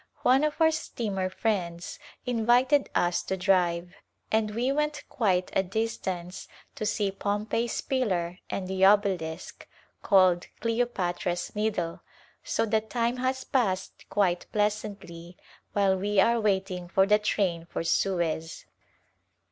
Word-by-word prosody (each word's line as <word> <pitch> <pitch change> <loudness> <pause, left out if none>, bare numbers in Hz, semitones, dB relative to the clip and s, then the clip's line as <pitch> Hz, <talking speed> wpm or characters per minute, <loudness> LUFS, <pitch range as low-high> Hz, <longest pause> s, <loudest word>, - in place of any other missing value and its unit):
One 265 +3 +5
of 305 +1 -1
our 320 -1 +5
steamer 205 -11 -3
friends 180 -5 -2 0.3
invited 250 +4 +3
us 175 0 +2
to 190 - -2
drive, 175 -2 +1 0.4
and 220 -1 +2
we 235 +5 0
went 300 +1 -1
quite 185 -6 +1
a - - +4
distance 190 -3 -4 0.3
to 215 - -3
see 205 -2 0
Pompey's 210 +4 -2
Pillar 185 -9 -1
and 185 - -3
the 190 0 -1
Obelisk, 190 -5 +2 0.3
called 185 -3 +4
Cleopatra's 195 -7 -1
Needle, 205 -6 -1 0.4
so - - 0
the 220 0 +1
time 235 +2 -1
has 260 +1 -1
passed 195 -8 -1
quite 185 -4 +1
pleasantly 200 -5 -3 0.4
while 195 -2 +3
we 200 +2 0
are 235 +4 +4
wait 195 -2 +1
ing 180 -1 -5
for 190 +2 +3
the 210 +1 +4
train 180 -5 -1
for - - -4
Suez. 165 -2 -1
200 Hz, 130 wpm, -27 LUFS, 180-225 Hz, 0.4 s, One